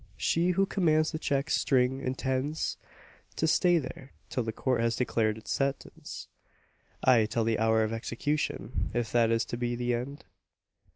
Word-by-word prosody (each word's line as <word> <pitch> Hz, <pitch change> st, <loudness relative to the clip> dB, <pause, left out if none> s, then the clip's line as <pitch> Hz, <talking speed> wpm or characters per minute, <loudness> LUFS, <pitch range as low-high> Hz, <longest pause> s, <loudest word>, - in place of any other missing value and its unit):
She 170 Hz, +2 st, +1 dB
who 195 Hz, -, +4 dB
commands 155 Hz, -6 st, +2 dB
the 155 Hz, -, -4 dB
check 140 Hz, +1 st, -1 dB
string 130 Hz, 0 st, +2 dB
intends 130 Hz, +3 st, -2 dB, 0.6 s
to -, -, 0 dB
stay 175 Hz, +2 st, +4 dB
there, 135 Hz, -2 st, -6 dB, 0.2 s
till 130 Hz, -, 0 dB
the 115 Hz, -1 st, -2 dB
Court 125 Hz, +1 st, 0 dB
has 115 Hz, 0 st, +1 dB
declared 110 Hz, -3 st, 0 dB
its 110 Hz, -, -8 dB
sentence 140 Hz, 0 st, -3 dB, 0.8 s
ay, 120 Hz, -4 st, +5 dB
till 115 Hz, +1 st, 0 dB
the 110 Hz, -1 st, +1 dB
hour 110 Hz, 0 st, +3 dB
of 110 Hz, +1 st, -2 dB
execution, 140 Hz, +6 st, -2 dB
if 120 Hz, -2 st, -1 dB
that 115 Hz, -2 st, +3 dB
is 115 Hz, 0 st, +2 dB
to 120 Hz, -, -5 dB
be 120 Hz, 0 st, -1 dB
the 120 Hz, 0 st, -1 dB
end! 130 Hz, +4 st, -4 dB
125 Hz, 165 wpm, -29 LUFS, 115-145 Hz, 0.8 s, ay